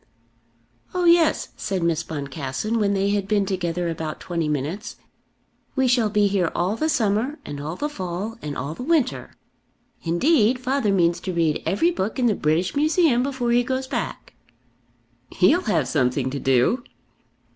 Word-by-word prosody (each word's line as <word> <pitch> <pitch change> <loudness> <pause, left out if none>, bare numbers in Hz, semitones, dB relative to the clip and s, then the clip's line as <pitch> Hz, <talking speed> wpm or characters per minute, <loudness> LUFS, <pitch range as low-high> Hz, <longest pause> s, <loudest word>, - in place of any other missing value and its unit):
"Oh 360 -1 +1
yes," 340 -2 +4
said 190 -3 -2
Miss 170 -1 +1
Boncassen, 145 - -3
when 200 -1 +1
they 195 +1 +1
had 200 -1 -1
been 205 -1 +2
together 175 -2 -2
about 160 -2 -4
twenty 170 -3 -2
minutes; 150 - -3 0.8
"we 265 -1 +2
shall 240 -3 +3
be 210 0 +2
here 195 -4 +1
all 185 +5 0
the 310 +7 -1
summer, 230 +3 0
and 145 -1 -6
all 155 +3 -4
the 295 - -2
fall, 190 -3 -5
and 145 -1 -5
all 140 +4 -4
the 165 - -9
winter. 290 -2 0 0.7
Indeed 225 - +3
father 255 -3 0
means 175 -3 +2
to 185 - -4
read 165 -3 +1
every 205 - +2
book 215 - -3
in 255 - +1
the 230 - +4
British 165 +1 0
Museum 305 -3 +3
before 260 -3 -1
he 240 +1 +4
goes 260 +1 -2
back." 260 - -5 1.0
"He'll 355 - +3
have 165 - +1
something 130 -1 0
to 140 - -3
do." 135 - +2
200 Hz, 165 wpm, -23 LUFS, 165-250 Hz, 1.0 s, yes